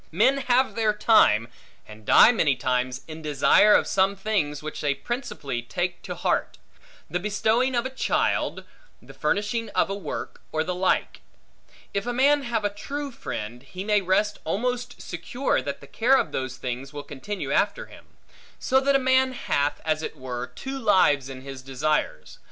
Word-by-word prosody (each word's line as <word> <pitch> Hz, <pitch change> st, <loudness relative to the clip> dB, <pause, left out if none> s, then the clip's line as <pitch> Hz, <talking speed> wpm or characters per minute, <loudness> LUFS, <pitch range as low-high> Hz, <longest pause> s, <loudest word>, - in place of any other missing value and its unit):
Men 235 Hz, -, +3 dB
have 260 Hz, 0 st, +2 dB
their 220 Hz, -2 st, +1 dB
time, 210 Hz, -, +4 dB, 0.4 s
and 105 Hz, 0 st, -14 dB
die 230 Hz, -, +8 dB
many 155 Hz, -, +2 dB
times, 125 Hz, 0 st, -1 dB
in 160 Hz, 0 st, -8 dB
desire 155 Hz, +7 st, +5 dB
of -, -, +3 dB
some 195 Hz, +1 st, +2 dB
things 185 Hz, -8 st, -1 dB
which 155 Hz, -, -6 dB
they 145 Hz, -2 st, +1 dB
principally 145 Hz, -, -4 dB
take 175 Hz, +8 st, -3 dB
to -, -, -6 dB
heart; -, -, -1 dB, 0.5 s
the 180 Hz, -, -2 dB
bestowing 220 Hz, +6 st, +1 dB
of 240 Hz, +1 st, 0 dB
a 260 Hz, -, -3 dB
child, 265 Hz, -, 0 dB, 0.4 s
the -, -, -15 dB
finishing 225 Hz, +2 st, -1 dB
of -, -, +2 dB
a -, -, 0 dB
work, 200 Hz, -, -6 dB
or 155 Hz, 0 st, 0 dB
the 180 Hz, +2 st, -3 dB
like. 185 Hz, +1 st, 0 dB, 0.7 s
If 200 Hz, +3 st, -2 dB
a 245 Hz, -, -1 dB
man 280 Hz, +4 st, +4 dB
have 235 Hz, -5 st, -2 dB
a -, -, +2 dB
true 280 Hz, +7 st, -5 dB
friend, 120 Hz, -, -6 dB
he 180 Hz, +8 st, -8 dB
may 210 Hz, 0 st, +2 dB
rest 205 Hz, +3 st, +1 dB
almost 245 Hz, +8 st, -2 dB
secure 250 Hz, -, -2 dB
that 140 Hz, +1 st, -5 dB
the -, -, -11 dB
care 245 Hz, -, +3 dB
of -, -, -1 dB
those 130 Hz, -1 st, -4 dB
things 130 Hz, +2 st, -5 dB
will 145 Hz, -1 st, -7 dB
continue 190 Hz, +11 st, -6 dB
after -, -, +1 dB
him. -, -, -16 dB, 0.5 s
So 265 Hz, -, +2 dB
that 275 Hz, +1 st, +2 dB
a 265 Hz, -1 st, +1 dB
man 260 Hz, 0 st, +4 dB
hath, 145 Hz, -, -1 dB
as 155 Hz, -1 st, 0 dB
it 155 Hz, -, -6 dB
were, 125 Hz, -2 st, -5 dB
two 270 Hz, 0 st, -5 dB
lives 150 Hz, -, +3 dB
in 130 Hz, -1 st, -8 dB
his 135 Hz, -1 st, -8 dB
desires. 135 Hz, -, -2 dB
190 Hz, 180 wpm, -25 LUFS, -, 0.7 s, die